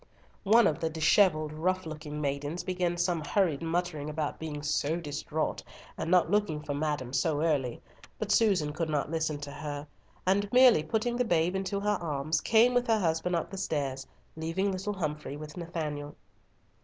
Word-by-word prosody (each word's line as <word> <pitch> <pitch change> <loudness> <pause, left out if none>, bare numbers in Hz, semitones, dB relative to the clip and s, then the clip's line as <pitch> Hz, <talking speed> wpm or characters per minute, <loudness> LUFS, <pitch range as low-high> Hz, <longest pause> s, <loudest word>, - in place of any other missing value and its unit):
One 225 +4 +6
of 150 - +1
the 165 - 0
dishevelled 155 -1 +3
rough 185 +4 -1
looking 155 -1 -6
maidens 145 +4 -2
began 180 -1 -1
some 175 -2 0
hurried 155 0 +1
muttering 165 -3 -2
about 150 -1 -3
being 150 -2 -5
so 150 +1 0
distraught, 155 -1 -3 0.3
and 165 - -4
not 180 -1 +4
looking 205 -7 +1
for 145 - -3
madam 145 -4 -2
so 155 +1 +1
early, 140 -7 0 0.4
but 215 -1 -3
Susan 185 -11 +3
could 160 +1 -2
not 150 0 -1
listen 160 -2 -1
to 145 0 -6
her, 145 -1 -5 0.4
and 200 +2 +2
merely 250 -8 +7
putting 220 +9 -1
the 250 - +2
babe 175 -4 +1
into 195 +1 -1
her 210 +1 0
arms, 155 0 -1
came 230 +3 +4
with 245 0 +2
her 225 -1 +4
husband 175 -1 0
up 170 - -2
the 195 - -5
stairs, 135 -6 -2 0.3
leaving 165 +5 -1
little 195 +2 -3
Humfrey 150 -5 -4
with 150 0 -9
Nathanael. 155 -4 -4
160 Hz, 175 wpm, -29 LUFS, 150-185 Hz, 0.4 s, merely